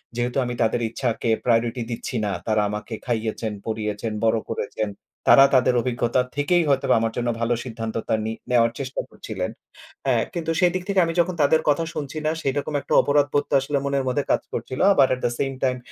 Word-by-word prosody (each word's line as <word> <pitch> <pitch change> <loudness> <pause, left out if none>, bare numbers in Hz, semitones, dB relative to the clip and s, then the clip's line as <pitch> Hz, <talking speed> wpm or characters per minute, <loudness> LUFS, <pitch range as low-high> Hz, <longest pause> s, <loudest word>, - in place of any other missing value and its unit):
যেহেতু 120 +2 -1
আমি 125 - -3
তাদের 115 +1 +1
ইচ্ছাকে 115 -1 -2 0.2
প্রায়োরিটি 120 +1 +1
দিচ্ছি 115 +1 -5
না। 100 - -1 0.2
তারা 110 -1 +2
আমাকে 105 +2 -5
খাইয়েছেন, 110 -2 -2
পরিয়েছেন, 110 0 -3
বড় 115 0 +3
করেছেন। 110 -1 -3 0.4
তারা 135 - +9
তাদের 125 0 +4
অভিজ্ঞতা 125 0 0
থেকেই 165 +4 +2
হয়তোবা 135 -1 +3
আমার 115 0 -1
জন্য 120 0 0
ভালো 115 +1 +2
সিদ্ধান্তটা 115 -2 -4
নি 110 - -2 0.2
নেওয়ার 115 -1 +4
চেষ্টা 135 -1 -3
করছিলেন। - - -5 0.6
অ্যা 130 -3 +3 0.2
কিন্তু 165 -2 -2
সেদিক 180 0 +2
থেকে 195 -1 +2
আমি 165 - -2
যখন 175 +1 +2
তাদের 145 +2 +4
কথা 145 +3 +2
শুনছি 145 0 -5
না, 155 - +2
সেরকম 145 +2 -2
একটা - - -4
অপরাধবোধ 145 0 +2
তো - - -4
আসলে 140 +2 -1
মনের 140 -1 0
মধ্যে 140 +2 0
কাজ - - +2
করছিল। 130 - -4
আবার 140 -7 +5
অ্যাট 130 0 -1
দা 120 - +1
সেইম 135 -1 0
টাইম 125 -1 +1
125 Hz, 190 wpm, -23 LUFS, 115-140 Hz, 0.6 s, তারা